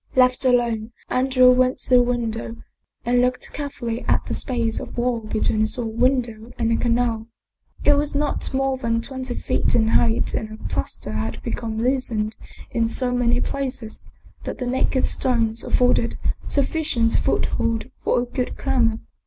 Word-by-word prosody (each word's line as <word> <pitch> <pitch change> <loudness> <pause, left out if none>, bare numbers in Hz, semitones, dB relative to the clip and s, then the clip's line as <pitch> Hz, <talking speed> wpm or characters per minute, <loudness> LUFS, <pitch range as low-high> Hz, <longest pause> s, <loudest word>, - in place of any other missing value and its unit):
Left 255 0 +4
alone, 235 -3 +1 0.2
Andrea 255 0 +5
went 255 +1 +3
to - - -6
the 250 -1 +7
window 230 -2 -2 0.5
and 245 +1 +3
looked 250 0 -1
care 290 0 -3
fully 235 -3 -4
at - - +2
the - - -3
space 235 -4 -1
of - - -8
wall 240 -1 +1
between 215 0 0
his 215 +4 +1
own 230 -1 -4
window 240 -3 +1
and 230 -1 +1
the 230 - +3
canal. 230 -2 0 0.6
It 290 - +7
was 290 0 0
not 290 0 -1
more 270 0 0
than 230 -2 0
twenty 260 -1 -4
feet - - 0
in 220 -1 +3
height 225 0 +2
and 215 - -2
the 215 - -9
plaster - - -3
had - - -3
become 225 -2 -3
loosened 230 -3 0 0.4
in 230 -1 +1
so 245 +2 -1
many 245 -1 +2
places 255 -5 -4 0.4
that - - -5
the 250 - -3
naked 260 +1 +1
stones 230 -3 0
afforded 245 -2 +2 0.3
sufficient 280 -5 +1
foothold 230 +2 0
for - - +2
a - - -2
good 250 +1 -3
climber. 230 -3 +1
245 Hz, 165 wpm, -22 LUFS, 230-255 Hz, 0.6 s, the